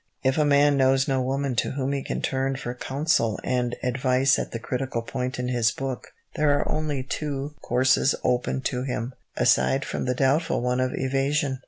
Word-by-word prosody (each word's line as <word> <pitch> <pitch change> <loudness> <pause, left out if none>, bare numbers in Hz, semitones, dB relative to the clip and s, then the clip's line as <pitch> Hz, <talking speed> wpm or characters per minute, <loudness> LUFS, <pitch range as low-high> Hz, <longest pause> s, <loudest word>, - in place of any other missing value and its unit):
If 130 +3 +2
a 150 - +4
man 145 0 +4
knows 135 0 +3
no 135 -1 +1
woman 135 0 -1
to - - 0
whom 135 0 -2
he 140 - -1
can - - -4
turn 135 0 0
for 120 -2 -5
counsel 130 -3 0
and 125 -1 0
advice 130 +2 +2
at - - -4
the - - -3
critical 125 0 -3
point 125 +1 -3
in 125 0 -2
his 120 -2 +2
book, 135 0 -5 0.3
there 145 -1 +3
are - - -2
only 150 -4 -2
two 140 +1 -4
courses 130 +2 +2
open 125 +1 0
to 125 -1 -2
him, 125 -1 -3 0.2
aside 130 +2 +3
from - - -3
the 125 0 0
doubtful 145 +6 +2
one 125 +1 0
of 130 0 0
evasion. 135 +1 0
130 Hz, 190 wpm, -25 LUFS, 125-140 Hz, 0.3 s, a